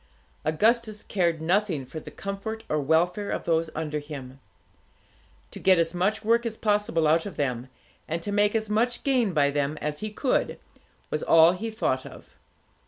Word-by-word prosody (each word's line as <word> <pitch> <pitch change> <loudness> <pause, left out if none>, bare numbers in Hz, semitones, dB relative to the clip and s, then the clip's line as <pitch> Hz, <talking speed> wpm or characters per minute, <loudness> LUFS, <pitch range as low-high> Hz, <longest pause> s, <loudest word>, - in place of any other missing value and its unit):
Augustus 215 +7 +1
cared 170 -5 0
nothing 175 -5 +1
for 155 - -7
the - - -10
comfort 200 +3 -5
or 150 - +1
welfare 175 +8 +1
of - - -2
those 165 -1 +1
under 150 -1 -2
him. 140 -3 -9 1.1
To - - -8
get 185 -1 +5
as 165 0 +1
much 195 +5 0
work 230 +1 +3
as 225 -2 -4
possible 205 -7 +1
out 165 +4 +3
of 200 - -9
them, 130 -3 -2 0.4
and 165 +2 -2
to 205 - -3
make 205 +1 +2
as 220 -1 0
much 230 +4 0
gain 250 -7 +2
by 145 -4 +2
them 145 +1 -1
as 150 0 -3
he 215 - -3
could, 250 +5 0 0.5
was - - -1
all 165 +1 +6
he 200 +5 -4
thought 130 - -1
of. - - -14
175 Hz, 175 wpm, -26 LUFS, 155-215 Hz, 1.1 s, all